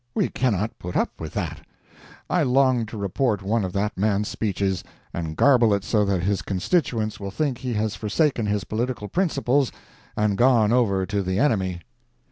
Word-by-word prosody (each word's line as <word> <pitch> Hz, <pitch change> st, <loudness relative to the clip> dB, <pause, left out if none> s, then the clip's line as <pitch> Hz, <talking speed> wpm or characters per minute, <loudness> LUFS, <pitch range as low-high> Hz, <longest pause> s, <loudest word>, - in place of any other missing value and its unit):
We -, -, +1 dB
cannot 110 Hz, -4 st, -1 dB
put 90 Hz, 0 st, -4 dB
up -, -, -1 dB
with 80 Hz, -2 st, -6 dB
that. -, -, -3 dB, 0.7 s
I 180 Hz, -, +1 dB
long 130 Hz, -4 st, +3 dB
to 110 Hz, -, -8 dB
report 100 Hz, +1 st, 0 dB
one 110 Hz, +2 st, +1 dB
of 95 Hz, -, -3 dB
that 105 Hz, +2 st, -1 dB
man's 105 Hz, 0 st, +1 dB
speeches, 100 Hz, -3 st, -1 dB, 0.3 s
and 80 Hz, -2 st, -4 dB
garble 120 Hz, -7 st, +5 dB
it 100 Hz, -, -3 dB
so 105 Hz, -1 st, +2 dB
that 95 Hz, -3 st, 0 dB
his 100 Hz, 0 st, 0 dB
constituents 110 Hz, -, -1 dB
will 100 Hz, -1 st, -5 dB
think 130 Hz, +4 st, -2 dB
he 125 Hz, -1 st, -3 dB
has 110 Hz, 0 st, -1 dB
forsaken 115 Hz, +1 st, 0 dB
his 105 Hz, -1 st, 0 dB
political 115 Hz, -1 st, -3 dB
principles 140 Hz, -, +1 dB, 0.5 s
and 105 Hz, -2 st, +1 dB
gone 120 Hz, -4 st, +4 dB
over 100 Hz, -7 st, +2 dB
to 100 Hz, +1 st, -1 dB
the 95 Hz, 0 st, -1 dB
enemy. 95 Hz, -9 st, +1 dB
105 Hz, 175 wpm, -24 LUFS, 100-125 Hz, 0.7 s, garble